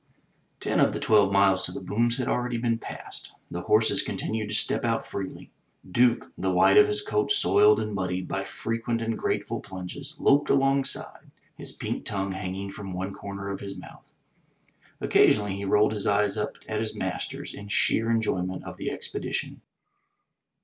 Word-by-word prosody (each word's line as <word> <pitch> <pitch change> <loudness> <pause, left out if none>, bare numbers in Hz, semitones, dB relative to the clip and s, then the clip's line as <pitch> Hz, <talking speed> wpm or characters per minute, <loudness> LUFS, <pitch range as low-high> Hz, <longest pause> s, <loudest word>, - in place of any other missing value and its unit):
Ten - - 0
of - - +4
the - - -3
twelve 105 -3 +4
miles 100 -1 +4
to - - -5
the - - -5
booms 120 +3 0
had 130 - -2
already 125 -1 0
been 115 -1 0
passed. - - -6 0.2
The 90 - -3
horses 110 +4 +3
continued 110 -1 -3
to 110 - -2
step - - +1
out 115 -1 0
freely. 95 -1 -6 0.4
Duke, 120 +3 +3
the 95 - -1
white 90 - +5
of 420 0 +8
his 420 0 -1
coat 420 0 0
soiled 415 +1 +5
and 105 - -3
muddied 95 -1 -2
by 95 - -2
frequent 115 +3 -3
and 115 0 -1
grateful - - -2
plunges, 100 +11 -8
loped 145 0 +3
alongside, 135 0 +1 0.3
his - - -5
pink - - -4
tongue 100 -1 -2
hanging 95 +1 -4
from 100 -1 -7
one 95 +2 -4
comer 100 0 -6
of 100 - -4
his 100 -1 -7
mouth. - - -13 0.9
Occasionally 105 -2 +3
he 100 - -4
rolled 105 +2 +3
his 105 -2 -2
eyes 100 0 +2
up 105 -1 -2
at 110 -1 -2
his 110 0 -3
master's - - -4
in 100 - -9
sheer 110 +2 +3
enjoy 115 -5 +1
ment 95 0 -4
of - - -8
the - - -3
expedition. - - -4
105 Hz, 175 wpm, -27 LUFS, 95-120 Hz, 0.9 s, of